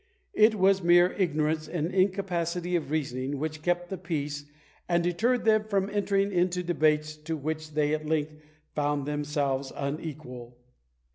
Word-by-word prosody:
It 215 Hz, +1 st, +5 dB
was 195 Hz, -1 st, +3 dB
mere 175 Hz, +1 st, +5 dB
ignorance 155 Hz, -4 st, 0 dB
and 170 Hz, +1 st, -2 dB
incapacity 180 Hz, -2 st, 0 dB
of 155 Hz, -5 st, -1 dB
reasoning 140 Hz, -2 st, -2 dB
which 155 Hz, +1 st, -4 dB
kept 175 Hz, +2 st, -1 dB
the 190 Hz, -, -4 dB
peace, 145 Hz, -5 st, -3 dB, 0.4 s
and 170 Hz, -1 st, +2 dB
deterred 225 Hz, +9 st, +1 dB
them 215 Hz, -1 st, +4 dB
from 200 Hz, -2 st, 0 dB
entering 200 Hz, -1 st, +1 dB
into 180 Hz, 0 st, +1 dB
debates 155 Hz, -3 st, +1 dB
to 160 Hz, +1 st, -4 dB
which 155 Hz, +1 st, -4 dB
they 150 Hz, 0 st, +2 dB
at 155 Hz, 0 st, -2 dB
length 155 Hz, -1 st, 0 dB, 0.4 s
found 145 Hz, -1 st, 0 dB
themselves 145 Hz, -2 st, -1 dB
unequal! 140 Hz, -4 st, -6 dB
160 Hz, 145 wpm, -28 LUFS, 150-180 Hz, 0.4 s, It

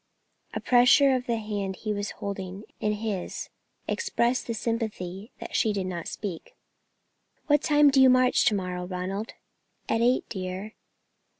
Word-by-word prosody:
A -, -, -1 dB
pressure 255 Hz, +3 st, +5 dB
of 250 Hz, -1 st, -1 dB
the 235 Hz, -1 st, +1 dB
hand 205 Hz, -3 st, -3 dB
which -, -, -19 dB
he 215 Hz, -1 st, 0 dB
was 205 Hz, 0 st, -3 dB
holding 195 Hz, 0 st, -6 dB, 0.2 s
in 210 Hz, 0 st, 0 dB
his 210 Hz, -4 st, -4 dB, 0.4 s
expressed 240 Hz, +2 st, 0 dB
the 230 Hz, -, -2 dB
sympathy 215 Hz, -4 st, -3 dB
that -, -, -7 dB
she 220 Hz, -, +3 dB
did 195 Hz, -2 st, -2 dB
not 175 Hz, -3 st, -4 dB
speak. 190 Hz, -6 st, -6 dB, 0.9 s
"What 295 Hz, -1 st, +3 dB
time 295 Hz, -2 st, +5 dB
do 270 Hz, -1 st, +5 dB
you 260 Hz, -, +8 dB
march 255 Hz, -1 st, +4 dB
to 220 Hz, -4 st, +4 dB
morrow, 180 Hz, -2 st, -3 dB
Ronald?" 190 Hz, +4 st, -4 dB, 0.5 s
"At 225 Hz, -, +1 dB
eight, 245 Hz, +2 st, +2 dB
dear." 190 Hz, +2 st, -5 dB
210 Hz, 160 wpm, -27 LUFS, 190-245 Hz, 0.9 s, you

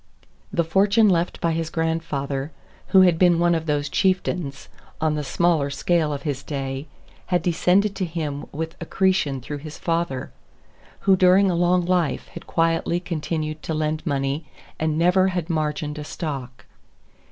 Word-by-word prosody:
The 175 Hz, -4 st, +1 dB
fortune 200 Hz, +6 st, +4 dB
left 175 Hz, -1 st, 0 dB
by 170 Hz, -2 st, +1 dB
his 165 Hz, 0 st, -2 dB
grandfather, 155 Hz, -4 st, -2 dB, 0.4 s
who 190 Hz, -, +6 dB
had 175 Hz, -3 st, +4 dB
been 175 Hz, -2 st, +5 dB
one 175 Hz, 0 st, +3 dB
of 160 Hz, -1 st, -2 dB
those 145 Hz, -1 st, 0 dB
chieftains, 180 Hz, -6 st, -1 dB, 0.3 s
on 155 Hz, -1 st, +1 dB
the 150 Hz, -1 st, -2 dB
smaller 160 Hz, -1 st, +1 dB
scale 155 Hz, +2 st, +1 dB
of 145 Hz, -, -4 dB
his 145 Hz, -4 st, -2 dB
day, 135 Hz, 0 st, -4 dB, 0.4 s
had 180 Hz, -1 st, +1 dB
descended 185 Hz, +4 st, +2 dB
to 190 Hz, -, 0 dB
him 155 Hz, -4 st, -4 dB
with 160 Hz, +2 st, -4 dB
accretion 170 Hz, -6 st, +1 dB
through 145 Hz, +3 st, -6 dB
his 150 Hz, +1 st, -9 dB
father, 165 Hz, -6 st, -2 dB, 0.7 s
who 195 Hz, -1 st, +5 dB
during 185 Hz, +1 st, +5 dB
a -, -, 0 dB
long 175 Hz, +1 st, +2 dB
life 175 Hz, -4 st, 0 dB
had -, -, -11 dB
quietly 165 Hz, +1 st, +1 dB
continued 155 Hz, -3 st, -3 dB
to 160 Hz, -, -3 dB
lend 155 Hz, 0 st, -1 dB
money 140 Hz, 0 st, -2 dB, 0.3 s
and 155 Hz, -1 st, 0 dB
never 180 Hz, +3 st, +4 dB
had 180 Hz, -2 st, -2 dB
margined 150 Hz, -1 st, -2 dB
a -, -, -5 dB
stock. 135 Hz, -6 st, -6 dB
165 Hz, 160 wpm, -23 LUFS, 150-175 Hz, 0.7 s, who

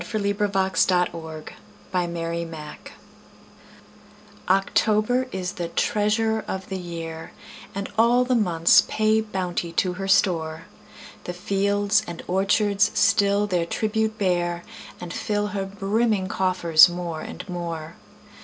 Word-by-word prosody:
Paul 215 Hz, +4 st, -3 dB
Laurence 200 Hz, -2 st, +1 dB
Dunbar 165 Hz, -4 st, -1 dB, 0.5 s
October 170 Hz, -3 st, -4 dB, 1.5 s
OCTOBER 215 Hz, +6 st, +2 dB
is 180 Hz, -1 st, -3 dB
the 175 Hz, -4 st, -4 dB
treasurer 215 Hz, +4 st, 0 dB
of 190 Hz, 0 st, -5 dB
the 190 Hz, -1 st, -3 dB
year, 165 Hz, -2 st, -7 dB, 0.4 s
And 200 Hz, 0 st, -3 dB
all 240 Hz, +2 st, +4 dB
the 255 Hz, -, 0 dB
months 175 Hz, -8 st, +4 dB
pay 215 Hz, 0 st, +2 dB
bounty 180 Hz, -5 st, -3 dB
to 180 Hz, +1 st, +1 dB
her 195 Hz, +1 st, -5 dB
store: 165 Hz, -5 st, +1 dB, 0.6 s
The 180 Hz, -, -4 dB
fields 200 Hz, +3 st, +1 dB
and 170 Hz, -1 st, -7 dB
orchards 200 Hz, +2 st, +2 dB
still 205 Hz, -2 st, +3 dB
their 180 Hz, -4 st, -1 dB
tribute 220 Hz, +2 st, -1 dB
bear, 175 Hz, -3 st, 0 dB, 0.4 s
And 175 Hz, -1 st, -7 dB
fill 210 Hz, 0 st, -1 dB
her 200 Hz, -2 st, -3 dB
brimming 200 Hz, 0 st, 0 dB
coffers 180 Hz, -4 st, +5 dB
more 175 Hz, -2 st, -5 dB
and 180 Hz, -, -8 dB
more. 170 Hz, -3 st, -5 dB
190 Hz, 115 wpm, -24 LUFS, 175-210 Hz, 1.5 s, coffers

